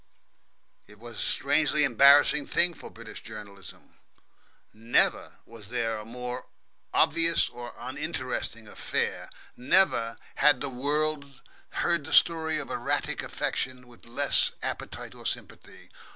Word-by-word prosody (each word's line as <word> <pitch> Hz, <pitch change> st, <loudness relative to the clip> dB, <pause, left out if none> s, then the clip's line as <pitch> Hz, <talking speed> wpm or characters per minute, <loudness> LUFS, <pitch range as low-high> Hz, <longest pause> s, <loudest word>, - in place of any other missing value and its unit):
It 105 Hz, +1 st, -16 dB
was 115 Hz, 0 st, -11 dB
a -, -, -2 dB
strangely 150 Hz, +1 st, +2 dB
embarrassing 140 Hz, +3 st, +5 dB
thing 175 Hz, 0 st, +5 dB
for -, -, -11 dB
British 115 Hz, -1 st, -11 dB
journalism. 105 Hz, -3 st, -12 dB, 0.7 s
Never 115 Hz, +2 st, +1 dB
was 110 Hz, -3 st, -13 dB
there 115 Hz, -2 st, -2 dB
a 105 Hz, -, -9 dB
more 125 Hz, +2 st, -6 dB, 0.4 s
obvious 165 Hz, 0 st, +3 dB
or 120 Hz, 0 st, -9 dB
uninteresting -, -, -4 dB
affair; -, -, -3 dB, 0.3 s
never 125 Hz, -5 st, +2 dB, 0.2 s
had 150 Hz, -, +5 dB
the 140 Hz, -, -3 dB
world 140 Hz, +1 st, -2 dB, 0.4 s
heard 170 Hz, -3 st, +2 dB
the 160 Hz, -, -6 dB
story 160 Hz, -2 st, +4 dB
of 150 Hz, -, -5 dB
erratic 140 Hz, +4 st, -1 dB
affection 125 Hz, -1 st, -4 dB
with 120 Hz, -1 st, -17 dB
less 140 Hz, +4 st, +1 dB
appetite -, -, -5 dB
or -, -, -6 dB
sympathy. -, -, -7 dB
130 Hz, 125 wpm, -27 LUFS, 115-150 Hz, 0.7 s, embarrassing